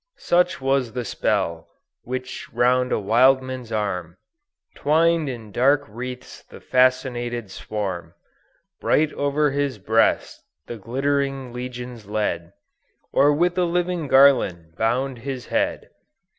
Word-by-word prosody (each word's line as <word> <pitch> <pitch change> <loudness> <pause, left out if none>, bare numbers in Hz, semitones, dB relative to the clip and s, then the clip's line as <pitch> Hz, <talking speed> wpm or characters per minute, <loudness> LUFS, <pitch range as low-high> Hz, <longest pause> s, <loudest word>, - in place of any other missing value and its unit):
"Such 180 +1 +2
was 135 -3 0
the 125 -1 -3
spell, 85 -4 -1 0.3
which 130 +1 -6
round 125 +1 +2
a - - +2
Wildman's 130 +3 +2
arm 90 -5 -3 0.6
Twin'd 160 +1 +2
in 115 -4 -7
dark 140 +6 +3
wreaths 125 +3 -8
the - - -14
fascinated 120 -4 +1
swarm; 95 -3 -5 0.6
Bright 155 0 +2
o'er 145 +1 +1
his 140 -3 -1
breast 110 +3 +1 0.2
the 120 - -7
glittering 135 +3 -2
legions 125 -3 -7
led, 100 -5 -2 0.6
Or 145 +2 +5
with 175 +4 +1
a 180 - +3
living 175 -2 -1
garland 100 -13 +4
bound 125 +4 -1
his 130 0 -5
head. 295 +1 -1
125 Hz, 115 wpm, -23 LUFS, 110-140 Hz, 0.6 s, Or